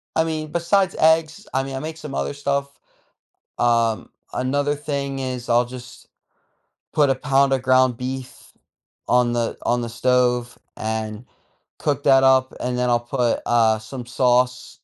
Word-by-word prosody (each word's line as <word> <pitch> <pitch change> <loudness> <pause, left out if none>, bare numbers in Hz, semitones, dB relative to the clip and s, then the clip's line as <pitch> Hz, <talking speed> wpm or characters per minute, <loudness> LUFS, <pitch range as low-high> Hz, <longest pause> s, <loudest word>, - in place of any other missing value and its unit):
I 160 - +3
mean, 155 -1 -4
besides 185 +3 +1
eggs, 160 +5 +2
I 135 - +1
mean, 135 0 -6
I 130 - -3
make 155 +2 -6
some 150 -3 -8
other - - -2
stuff. 140 0 -2 0.8
Um, 115 -3 +1 0.2
another 145 +3 0
thing 140 -2 -3
is 125 -2 -4
I'll 120 +1 +4
just 125 +1 -11 0.9
put 145 -2 +4
a - - +3
pound 135 0 +2
of 135 - +2
ground 130 -1 +3
beef 130 +1 -7 0.6
on 125 -1 +3
the 120 -1 -1
on 120 0 +1
the 120 - -4
stove 125 0 +1 0.2
and 110 0 -4 0.5
cook - - -1
that 135 0 +5
up, 130 0 +4
and 125 0 -2
then 125 0 +1
I'll 120 - +3
put, 120 0 -1
uh, 115 -2 +3
some 120 +3 -8
sauce. 125 0 +1
130 Hz, 160 wpm, -22 LUFS, 120-140 Hz, 0.9 s, that